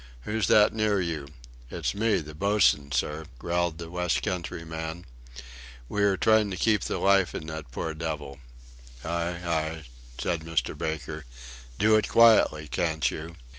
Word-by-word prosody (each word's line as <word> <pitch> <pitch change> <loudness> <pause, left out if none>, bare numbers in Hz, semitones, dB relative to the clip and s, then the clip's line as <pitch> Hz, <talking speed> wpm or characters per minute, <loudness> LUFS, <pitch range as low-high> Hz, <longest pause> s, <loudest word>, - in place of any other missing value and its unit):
Who's 105 - -1
that 105 0 +5
near 110 -2 +1
you?" 80 -6 -3 0.4
"It's - - -2
me 110 -1 +1
the 75 0 -10
boatswain, 90 -5 +2
sir," 75 +5 -1
growled 85 +2 -1
the 85 -1 -8
West 90 -1 0
country 85 -2 -3
man; 80 +1 -6 0.8
"we 105 - -2
are 100 -2 +3
trying 110 0 +4
to 95 - -4
keep 105 +3 +1
life 95 -2 +2
in - - -5
that 80 -3 -7
poor 80 +6 -3
devil." 75 -4 -5 0.7
"Aye, 85 +1 -2
aye!" 80 -1 -1 0.4
said 85 -2 -1
Mr. 80 -4 -1
Baker. 80 -1 -4 0.5
"Do 110 +1 +4
it 110 - 0
quietly, 110 -10 +5
can't 80 0 0
you?" 80 +2 -7
85 Hz, 150 wpm, -27 LUFS, 80-100 Hz, 0.8 s, that